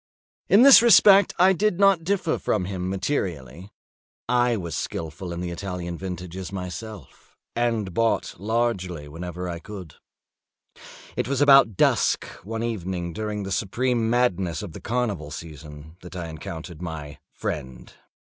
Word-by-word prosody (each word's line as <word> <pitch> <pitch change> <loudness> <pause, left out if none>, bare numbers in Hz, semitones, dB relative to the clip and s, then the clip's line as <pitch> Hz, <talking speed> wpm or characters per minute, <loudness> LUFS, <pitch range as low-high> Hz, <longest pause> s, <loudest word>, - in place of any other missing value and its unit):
In 205 +5 +7
this 275 -3 +10
respect 200 -3 +7
I 185 +2 +5
did 195 0 0
not 195 -4 +4
differ 180 -2 0
from 100 -4 -1
him 90 -1 -4
materially: 95 - -3 0.6
I 120 -1 +2
was 85 -5 -5
skilful 80 +3 -5
in 85 0 -5
the 90 -1 -4
Italian 90 -1 -5
vintages 90 0 -6
myself, 95 - -8 0.2
and 115 -5 -1
bought 115 +4 0
largely 100 -7 -1
whenever 90 +3 -6
I 85 -1 -5
could. 90 -3 -10 1.2
It - - -1
was 135 0 -1
about 135 -8 +6
dusk, - - +2 0.2
one 115 +3 -4
evening 90 -6 -3
during 105 0 -4
the 95 - -6
supreme 115 +4 0
madness 95 -7 0
of 100 - -7
the - - -10
carnival 110 -11 -2
season, 75 +1 -10
that 90 +1 -11
I 85 -2 -5
encountered 80 +1 -8
my 75 -4 -7
friend. 65 -1 -6
95 Hz, 140 wpm, -24 LUFS, 85-120 Hz, 1.2 s, this